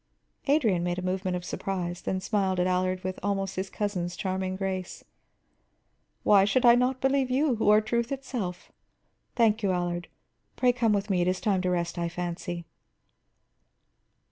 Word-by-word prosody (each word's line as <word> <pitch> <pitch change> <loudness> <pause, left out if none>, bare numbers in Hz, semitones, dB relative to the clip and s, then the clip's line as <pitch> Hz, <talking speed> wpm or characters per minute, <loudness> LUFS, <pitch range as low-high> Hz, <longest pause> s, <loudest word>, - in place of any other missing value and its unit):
Adrian 230 - +3
made 175 0 -1
a - - -2
movement 185 0 -1
of 175 - -8
surprise, 180 -3 -3
then 190 - -2
smiled 190 -1 0
at 180 - +2
Allard 185 0 0
with 185 0 -4
almost 195 -1 -1
his 190 +1 -3
cousin's 180 -4 -2
charming 185 -1 -2
grace. 190 -1 -4 1.2
"Why 200 -2 +6
should 225 +6 +2
I 235 - +9
not 250 +2 +2
believe 270 -1 +2
you, 260 -1 +2
who 210 - +2
are 210 +1 +6
truth 235 +3 -1
itself? 245 -10 -4 0.6
Thank 225 -2 +3
you, 200 -3 +1
Allard. 175 -1 -2 0.5
Pray 250 -1 +3
come 235 -3 +2
with 205 0 -1
me; 180 -2 +2
it 175 - +1
is 185 0 +1
time 195 -3 +1
to 180 - 0
rest, 175 -1 -1
I 170 0 -1
fancy." 175 0 -4
190 Hz, 170 wpm, -27 LUFS, 180-220 Hz, 1.2 s, I